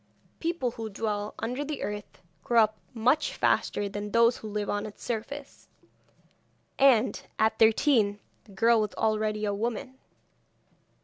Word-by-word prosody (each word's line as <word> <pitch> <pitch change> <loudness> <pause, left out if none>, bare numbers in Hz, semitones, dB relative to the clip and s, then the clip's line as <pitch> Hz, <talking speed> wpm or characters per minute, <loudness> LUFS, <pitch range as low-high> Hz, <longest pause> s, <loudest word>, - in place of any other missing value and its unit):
People 330 -7 -1
who 225 -1 -6
dwell 210 0 -3
under 250 +5 -3
the 290 -1 -4
earth 205 -2 -6 0.2
grow 235 -2 +5
up 215 0 -2 0.2
much 255 +7 +2
faster 205 - +1
than 205 +1 -5
those 230 +2 +4
who 220 - -8
live 210 0 -3
on 205 +1 -2
its 210 - -12
surface, 225 -2 -6 1.1
and, 255 -4 +4 0.2
at 220 0 +2
thirteen, 220 -2 +4 0.3
the 210 - -17
girl 230 +3 +4
was 210 -2 -3
already 215 -1 0
a 205 - 0
woman. 235 +5 -4
220 Hz, 140 wpm, -28 LUFS, 210-240 Hz, 1.1 s, grow